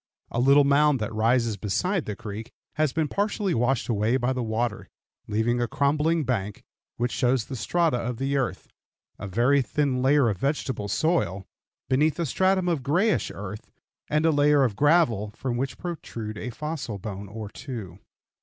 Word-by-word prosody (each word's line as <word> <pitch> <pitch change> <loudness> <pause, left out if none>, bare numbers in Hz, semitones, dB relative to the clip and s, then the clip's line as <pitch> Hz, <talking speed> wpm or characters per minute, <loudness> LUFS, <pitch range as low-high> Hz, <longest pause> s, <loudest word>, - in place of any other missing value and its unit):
A 120 - -1
little 140 +3 +6
mound 145 0 +4
that 110 0 -3
rises 115 0 +2
beside 170 - -1
the 105 - -4
creek 110 +3 -7 0.2
has 155 -2 +1
been 160 +1 0
partially 205 +1 -1
washed 125 +2 +1
away 110 +2 +1
by 130 0 0
the 130 - -2
water, 115 -1 -2 0.4
leaving 110 +3 0
a 120 - +1
crumbling 150 +6 +1
bank, 105 -6 -2 0.3
which 120 +1 0
shows 125 -3 +1
the 135 - -6
strata 155 +5 +1
of 120 0 -3
the 135 +2 -1
earth, 135 -3 -2 0.5
a 100 - -5
very 120 +8 +3
thin 135 0 0
layer 135 0 +4
of 100 -5 -1
vegetable 135 -6 -1
soil, 100 - 0 0.4
beneath 150 +4 +2
a 170 - 0
stratum 185 +5 +2
of 165 -5 0
grayish 175 - +1
earth, 105 +1 -8 0.4
and 155 +2 +2
a 165 - +5
layer 145 -1 +4
of 115 -6 0
gravel, 145 - +3
from 125 -2 -3
which 130 -1 -3
protrude 115 -11 -6
a 110 +3 -5
fossil 145 -4 -5
bone 100 0 -6
or 105 +1 -7
two. 110 - -8
130 Hz, 175 wpm, -26 LUFS, 110-150 Hz, 0.5 s, little